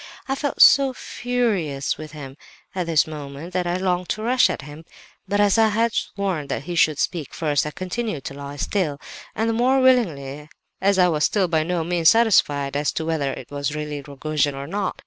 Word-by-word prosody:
"I 270 - 0
felt 285 +1 +3
so 275 -1 +6
furious 215 - -2
with 155 -1 -9
him 135 -3 -9 0.4
at 180 -2 -3
this 160 -3 +3
moment 150 +2 -8
that 180 -1 -1
I 175 - 0
longed 180 -1 -1
to 215 - -2
rush 250 +2 +3
at - - -4
him; 150 +3 -11 0.4
but 205 +2 0
as 205 +1 +4
I 220 - +6
had 225 +1 +1
sworn 190 -7 -2
that - - -3
he 175 - -5
should 155 -3 +3
speak 165 -4 -3
first, 150 -2 0
I - - -2
continued 185 - -4
to - - -6
lie 140 0 -8
still—and 180 +6 -3
the 225 - +1
more 255 +4 +3
willingly, 150 - +1 0.3
as 195 0 +3
I 180 -1 +5
was 155 -3 0
still 195 -3 +1
by 160 -2 +1
no 170 +1 -1
means 170 -1 +3
satisfied 145 -12 +3
as 145 +1 0
to 160 - -3
whether 155 -4 -1
it - - -9
really 150 +1 -3
was 140 - -17 0.2
Rogojin 150 -2 +1
or 135 0 -6
not. 195 +5 -3
170 Hz, 205 wpm, -22 LUFS, 145-205 Hz, 0.4 s, so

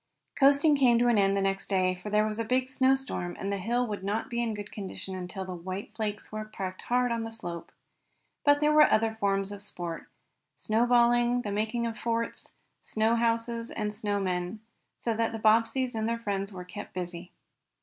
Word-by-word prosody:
Coasting 285 +2 +5
came 250 -4 +5
to 240 +1 +3
an 230 -3 +4
end 195 0 +3
the 195 - +1
next 195 0 -1
day, 185 -2 +2
for 185 +3 -7
there 210 +1 +3
was 215 +1 -2
a - - +1
big 255 +3 +1
snow 260 0 +3
storm, 180 -10 -4
and 200 +1 -2
the 200 - -2
hill 240 +6 0
would 205 -4 -5
not 210 +5 -2
be 235 0 0
in 225 -2 -1
good 205 0 -7
condition 195 -1 -6
until 185 +1 -5
the 185 - -5
white 185 +3 -6
flakes 210 -2 -4
were 215 0 -4
packed 190 -3 -6
hard 245 0 +1
on 230 -1 -1
the 225 - -5
slope. 175 -7 -7 0.7
But 290 0 +4
there 300 0 +4
were 300 0 +7
other 220 0 +2
forms 195 -1 0
of 205 -1 -7
sport 175 -5 -5 0.5
snowballing, 240 +2 +3
the 205 - -3
making 220 +3 -1
of 225 -2 -4
forts, 230 0 -2 0.2
snow 220 +1 +1
houses 230 0 0
and 210 -1 -3
snow 205 -1 -1
men, 180 +2 -2 0.4
so 230 - -1
that 225 +1 0
the - - -2
Bobbseys 225 +4 +3
and 220 0 -1
their 230 - 0
friends 200 -3 -3
were 180 -2 -8
kept 180 - -9
busy. 180 0 -5
215 Hz, 205 wpm, -29 LUFS, 195-235 Hz, 0.7 s, were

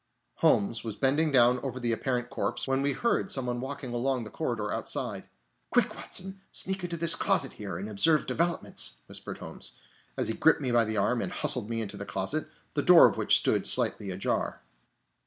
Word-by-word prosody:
Holmes 105 +2 +2
was 110 -3 -5
bending 145 +4 +1
down 125 -1 +5
over 130 -2 -5
the 120 -1 -1
apparent 120 +1 -2
corpse, - - -2
when 135 0 0
we 140 0 0
heard 235 - -1
some 135 -6 -1
one 120 0 -3
walking 135 -2 -6
along 125 +1 -1
the 105 - -10
corridor - - -3
outside. - - -3 0.4
"Quick, - - +2
Watson, 190 +1 -1
sneak 190 0 -3
into 170 -1 -3
this 165 0 +7
closet 135 - +2
here, 100 -5 -7
and 95 +3 -6
observe 150 +10 +2
developments!" 170 +1 0
whispered - - -8
Holmes, - - -8 0.4
as - - -1
he 110 - 0
gripped 160 - +3
me 130 -4 -2
by 120 -1 +3
the 110 0 -3
arm, 120 +4 +1
and 180 - -4
hustled 135 -10 +1
me 115 -1 -2
into 105 -2 -6
the 100 - -6
closet, 95 +12 -2 0.2
the - - 0
door - - +7
of - - +2
which - - +3
stood - - +1
slightly 100 - +2
ajar. 95 -7 -3
125 Hz, 195 wpm, -28 LUFS, 110-150 Hz, 0.4 s, this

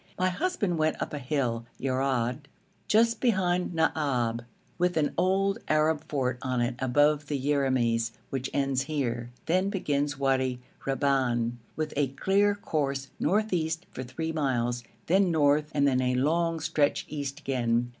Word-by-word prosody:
My 185 0 +2
husband 205 - -1
went 155 0 +1
up - - -4
a 150 - -3
hill, 125 -4 -1
Yerad, 130 0 -1 0.4
just 230 +1 +3
behind 180 -7 +1
Naab, 130 -8 +1 0.4
with 180 -1 +1
an 150 -2 +1
old 195 +3 +2
Arab 155 0 +2
fort 130 -3 -1
on 130 -2 -1
it 120 +1 +1
above 145 +3 +2
the 145 - -1
Yeramis, 130 -5 +1 0.2
which 135 0 -2
ends 135 -1 0
here; 120 -5 -2 0.2
then 185 +4 +2
begins 145 -7 -1
Wadi 130 -2 +1 0.3
Reban, 130 -4 +1 0.2
with 155 -1 -3
a 140 -1 +2
clear 200 +9 +2
course 140 -8 -2
north 210 +5 +1
east 160 0 -1
for - - -6
three 130 +6 -4
miles, 120 -5 0 0.2
then 190 +2 +3
north, 150 -2 +3
and 140 -2 +2
then 130 -2 +2
a 125 0 +1
long 165 +5 +1
stretch 145 -1 +1
east 140 -2 -4
again. 120 -2 0
145 Hz, 150 wpm, -28 LUFS, 130-165 Hz, 0.4 s, just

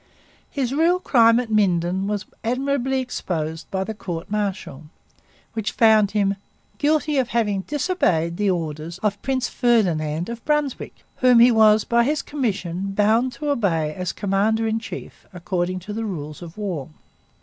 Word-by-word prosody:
His 265 -3 -2
real 335 +5 +3
crime 230 -8 +4
at 240 -3 -4
Minden 190 -2 +1
was 205 -1 -2 0.2
admirably 265 +2 0
exposed 165 -10 -4
by 190 0 -1
the 220 - -5
court 175 -3 -6
martial 195 -8 -3 0.7
which 220 -2 -3
found 220 -3 +5
him 200 -1 0 0.4
'guilty 300 -1 +2
of 255 - +1
having 210 -5 0
disobeyed 255 - 0
the 205 -1 +1
orders 165 -1 -3
of 205 -1 0
Prince 265 -2 -1
Ferdinand 170 -9 +1
of 235 0 -7
Brunswick, 295 -3 -2
whom 250 -1 +5
he 240 +2 +7
was 220 -1 +5
by 235 0 +2
his 295 +4 0
commission 195 - -3
bound 220 +5 +2
to 290 +4 -2
obey 165 - 0
as 180 +1 -3
commander 210 +3 0
in 220 0 0
chief, 225 - -9
according 180 0 -2
to 210 +4 -7
the 225 +2 -3
rules 155 -8 -6
of 170 +2 -10
war.' 180 -10 -4
210 Hz, 155 wpm, -22 LUFS, 180-245 Hz, 0.7 s, he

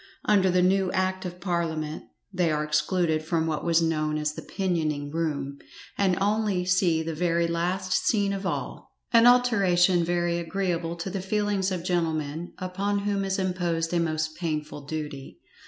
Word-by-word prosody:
Under 195 -3 +4
the 180 0 +3
new 190 0 +2
Act 185 0 0
of 180 0 -6
Parliament 165 -4 -2 0.3
they 180 -2 +1
are 150 0 0
excluded 155 +2 +1
from 160 0 0
what 155 -2 -2
was 165 0 +3
known 155 -2 0
as 150 0 -1
the - - -7
pinioning 155 -7 -2
room, 140 -4 -2 0.4
and 190 -3 +2
only 205 -2 +1
see 180 -3 +2
the 165 0 -3
very 170 +1 +1
last 180 +3 -1
scene 200 -3 +2
of 195 0 -4
all, 190 - -4 0.2
an 230 +1 +7
alteration 195 -8 +4
very 175 0 0
agreeable 170 -1 -2
to 170 +3 -5
the 195 0 -3
feelings 200 -1 0
of 180 -2 -3
gentlemen 165 -2 -1
upon 195 +2 -2
whom 200 -1 -1
is 195 0 -1
imposed 175 -3 -1
a 175 - +2
most 155 -1 -1
painful 150 -4 -4
duty. 150 -3 -6
175 Hz, 165 wpm, -26 LUFS, 160-190 Hz, 0.4 s, an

